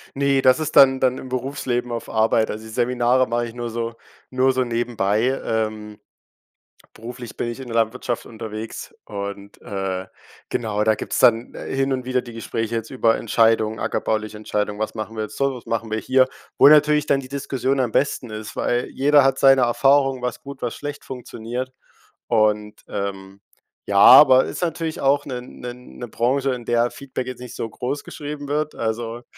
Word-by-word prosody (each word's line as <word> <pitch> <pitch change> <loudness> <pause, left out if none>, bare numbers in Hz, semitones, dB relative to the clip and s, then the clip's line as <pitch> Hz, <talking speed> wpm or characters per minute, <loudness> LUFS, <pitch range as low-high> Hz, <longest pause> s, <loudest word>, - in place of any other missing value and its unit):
Ne, 140 -1 +2
das 130 +3 +5
ist 155 - -3
dann 130 -1 +7
dann 130 -1 +2
im - - -8
Berufsleben 125 -1 -2
auf 115 -1 -4
Arbeit. 110 0 +2
Also 110 +1 -7
die - - -10
Seminare 125 +2 +2
mache 120 0 -1
ich 115 - -11
nur 120 -1 -4
so 115 0 -4 0.3
nur 130 +1 +2
so 130 0 +1
nebenbei. 120 0 0
Ähm, 110 -1 -3 0.9
beruflich 120 +1 -9
bin - - -2
ich 120 - -7
in 130 - -8
der 115 - -4
Landwirtschaft 115 +1 -1
unterwegs 110 -1 -7
und, 100 0 -7
äh, 95 -1 -4 0.4
genau, 105 -2 -1
da 110 0 +3
gibt's - - -4
dann, 115 0 +3
äh, - - -7
hin 135 0 +1
und 130 -1 -2
wieder 130 0 0
die 120 - -10
Gespräche 115 0 -4
jetzt 115 0 -4
über 115 -4 +2
Entscheidungen, 110 -1 +2
ackerbauliche 110 0 -2
Entscheidung: 105 -1 -3
„Was 110 - -3
machen 110 +1 -5
wir 110 - -2
jetzt - - -9
so, 140 -1 0
was 125 - -11
machen 115 -1 -2
wir 110 - -1
hier.“, 130 +3 +3 0.3
wo - - +8
natürlich 150 0 +5
dann 140 - +2
die 130 - -11
Diskussion 135 -1 -2
am 120 -3 0
besten 130 -2 0
ist, 110 0 -7
weil 120 0 0
jeder 145 +2 +4
hat 135 0 +2
seine 135 -1 +6
Erfahrung, 135 +2 +3
was 125 -1 -4
gut, 140 -1 -10
was 120 - -2
schlecht 145 0 -7
funktioniert 125 0 -6 0.6
und, 105 -2 +1
ähm, 100 -1 -5 0.5
ja, 100 - +1
aber 130 +5 +9
ist - - -6
natürlich 165 -2 -2
auch 140 +1 +2
'ne 125 -3 -5
'ne 125 0 -8
'ne 125 -1 -10
Branche, 130 +5 0
in 120 -2 -6
der 120 0 +2
Feedback 130 -2 -6
jetzt 125 -1 -7
nicht 125 -2 -9
so - - -3
großgeschrieben 145 +3 -5
wird. 150 +1 -1
Also, 115 +1 -3
120 Hz, 185 wpm, -22 LUFS, 110-130 Hz, 0.9 s, aber